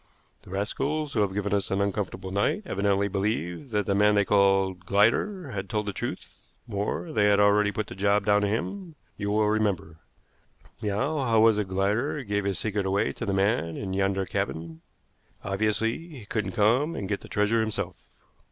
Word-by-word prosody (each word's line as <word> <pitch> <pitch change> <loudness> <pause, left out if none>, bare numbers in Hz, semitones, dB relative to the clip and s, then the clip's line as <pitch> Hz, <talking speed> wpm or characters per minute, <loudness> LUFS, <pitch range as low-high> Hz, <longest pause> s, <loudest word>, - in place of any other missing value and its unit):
"The - - -16
rascals 140 +10 -2
who 110 - +2
have 100 -2 +1
given 100 -1 -1
us 100 -2 +1
an 95 - 0
uncomfortable 100 -2 -2
night 100 - 0
evidently 100 - +1
believed 100 - -2
that 105 -3 0
the 100 - +1
man 105 +1 +4
they 100 -1 +3
called 95 -2 +3
Glider 120 - +2
had 95 -2 -5
told 105 -1 -1
the 100 - -3
truth; - - -4 0.4
more, 110 - -3
they 105 -1 +3
had 105 0 +4
already 105 0 +4
put 110 +1 -2
the - - -9
job 100 +1 +1
down 105 -1 +4
to 105 - +1
him, 165 - -3 0.2
you 100 - -3
will 105 +1 +2
remember. 105 -7 0 0.8
Now, 130 +9 -1
how 115 -4 +2
was 110 -1 +5
it 105 - -1
Glider 105 +10 0
gave 105 -2 -1
his 100 -2 -1
secret 105 -2 -1
away 100 +1 +1
to - - -6
the - - +1
man 95 -4 +1
in 95 -2 -4
yonder 95 0 0
cabin? 80 -2 -4 0.6
Obviously 110 +8 -1
he 135 -10 -11
couldn't 105 +1 -2
come 125 +9 +2
and 100 - -4
get 100 +1 -2
the - - -12
treasure 105 +2 +2
himself." 100 -5 -3
105 Hz, 190 wpm, -27 LUFS, 100-110 Hz, 0.8 s, was